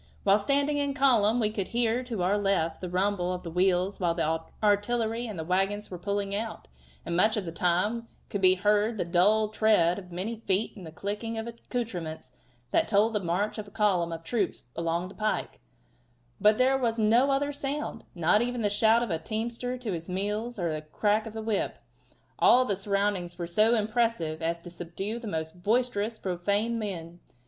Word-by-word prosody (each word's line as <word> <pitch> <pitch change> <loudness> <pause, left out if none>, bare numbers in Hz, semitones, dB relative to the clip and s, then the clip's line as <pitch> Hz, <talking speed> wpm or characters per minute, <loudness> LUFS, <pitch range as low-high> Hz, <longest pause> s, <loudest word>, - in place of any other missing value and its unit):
While 200 +1 +5
standing 285 +6 +1
in 285 -1 -1
column 245 -5 +4
we 215 -2 +2
could 200 -3 -2
hear 240 +1 +1
to 225 -7 -3
our 190 +3 +2
left 195 -6 0
the 180 - -4
rumble 185 0 0
of 180 0 -4
the 170 - -6
wheels 185 +2 +1
while 170 -3 +1
the 160 -1 0 0.2
artillery 225 +3 +1
and 210 -4 -6
the 160 - -3
wagons 195 +4 0
were 180 - -6
pulling 200 +1 -2
out, 220 +2 -4 0.4
and 170 - -2
much 215 +5 +4
of 205 - -2
the 165 - -4
time 185 +7 0 0.2
could 200 - -3
be 185 0 +6
heard 210 +3 +2
the 185 - -1
dull 205 +5 +3
tread 210 -5 +3
of 180 -2 -13
many 195 +7 -3
feet 205 -1 0
and 190 -6 -9
the - - -9
clicking 210 +6 -4
of 225 - -3
accoutrements 205 - -5 0.4
that - - +2
told 215 +2 +3
of 210 - +1
the 175 - -6
march 200 +6 -1
of 210 - -6
a - - -11
column 195 -5 +1
of 165 0 -6
troops 195 - -2
along 170 +2 -1
the 190 - -11
pike, 215 0 -2 0.8
but 210 +1 +5
there 265 +1 +3
was 235 -3 0
no 230 +5 +4
other 280 +1 +1
sound 285 +1 -4
not 175 +5 +3
even 245 -1 -1
the 205 - +2
shout 220 +3 +4
of 235 - -3
a 165 - 0
teamster 235 +6 -3
to 245 -4 -4
his 170 0 -5
mules 210 +6 -2
or 170 -4 -1
the 155 - -3
crack 210 +8 0
of 220 - -9
a 220 - -4
whip. 215 -2 -1 0.6
All 255 +1 +6
the 205 - 0
surroundings 195 -3 -1
were 175 - -3
so 215 +7 +3
impressive 215 -8 0
as 165 +1 -1
to 175 - -10
subdue 180 +6 -5
the 235 - -7
most 160 -1 -4
boisterously 225 0 0
profane 200 +6 0
men. 175 -5 -5
205 Hz, 200 wpm, -28 LUFS, 180-225 Hz, 0.8 s, be